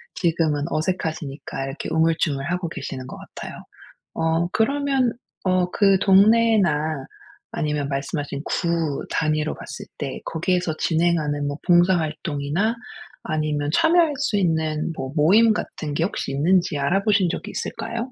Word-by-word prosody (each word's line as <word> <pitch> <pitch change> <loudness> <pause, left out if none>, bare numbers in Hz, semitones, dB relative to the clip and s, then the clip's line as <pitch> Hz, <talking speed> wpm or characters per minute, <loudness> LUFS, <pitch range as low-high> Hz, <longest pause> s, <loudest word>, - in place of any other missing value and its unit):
지금은 160 -4 +1
어색하시니까 155 -5 -3
이렇게 135 +2 -5
우물쭈물하고 160 +1 0
계시는 135 -3 -6
것 - - -8
같아요. - - -9 0.6
어 165 +1 +1
그러면 270 0 +1 0.3
어 185 -1 +2
그 195 -2 +4
동네나 195 -8 +4 0.5
아니면 150 -2 -1
말씀하신 140 0 -3
구 165 -5 -1
단위로 155 -1 0
봤을 - - -8
때 - - -4
거기에서 175 0 -1
진행하는 160 -4 +1
뭐 145 +1 -3
봉사활동이나 170 +1 +2 0.5
아니면 150 -2 -1
참여할 325 -1 +4
수 270 -6 0
있는 160 -3 0
뭐 130 0 -4
모임 205 +9 +5
같은 150 -7 -4
게 160 - 0
혹시 165 -6 -3
있는지 170 +2 +2
알아보신 195 +5 +2
적이 - - -4
있을까요? 235 +2 -4
165 Hz, 310 characters per minute, -23 LUFS, 150-190 Hz, 0.6 s, 모임